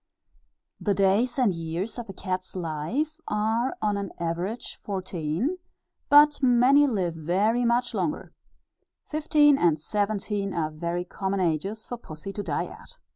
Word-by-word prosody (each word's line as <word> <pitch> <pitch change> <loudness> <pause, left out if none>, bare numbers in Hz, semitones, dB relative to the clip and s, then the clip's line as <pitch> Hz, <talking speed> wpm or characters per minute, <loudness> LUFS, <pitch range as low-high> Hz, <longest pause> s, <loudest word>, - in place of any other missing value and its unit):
The 200 -2 0
days 200 +6 +2
and 245 -7 +3
years 165 +7 -4
of 235 - -7
a - - -6
cat's 185 0 -4
life, 185 - -2
are 220 +4 0
on 210 -1 +1
an 200 -1 -4
average 175 +7 -3
fourteen, 185 - -3 0.5
but 295 0 +7
many 260 +3 +5
live 190 -9 0
very 195 +9 +1
much 240 +1 +1
longer. 265 +9 -2 0.7
Fifteen 295 -2 +3
and 165 -3 +3
seventeen 205 +1 -2
are 155 -2 -1
very 170 +3 -3
common 195 +1 -2
ages 190 +5 -1
for 245 - -5
Pussy 180 -3 -8
to 205 - -4
die - - -1
at. - - -13
200 Hz, 140 wpm, -26 LUFS, 175-245 Hz, 0.7 s, but